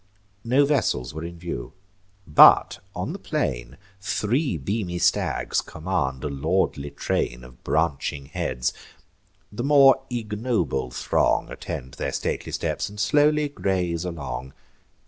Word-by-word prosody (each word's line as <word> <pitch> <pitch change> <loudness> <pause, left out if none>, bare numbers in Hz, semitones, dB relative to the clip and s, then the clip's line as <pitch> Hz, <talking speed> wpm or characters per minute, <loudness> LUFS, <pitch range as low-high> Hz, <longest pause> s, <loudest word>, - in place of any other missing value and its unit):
No 130 +5 +4
vessels 130 - 0
were 80 +1 -6
in 85 +1 -7
view; 85 -8 -6 0.5
but, 75 - +7 0.2
on - - -3
the - - -7
plain, - - -3 0.2
Three 110 - 0
beamy 90 +4 -3
stags 90 +1 +1
command 80 -6 -3
a - - -1
lordly 70 0 -1
train 60 -3 -2
Of 60 0 -15
branching 70 -3 -1
heads: 60 -2 -2 0.8
the 105 +3 -4
more 135 -1 +6
ignoble 105 - -1
throng - - +1
Attend 65 +1 -6
their 70 - -1
stately - - -3
steps, - - -2
and 105 0 -11
slowly 150 +7 +3
graze 90 - -1
along. 70 -7 -5
85 Hz, 125 wpm, -24 LUFS, 70-110 Hz, 0.8 s, but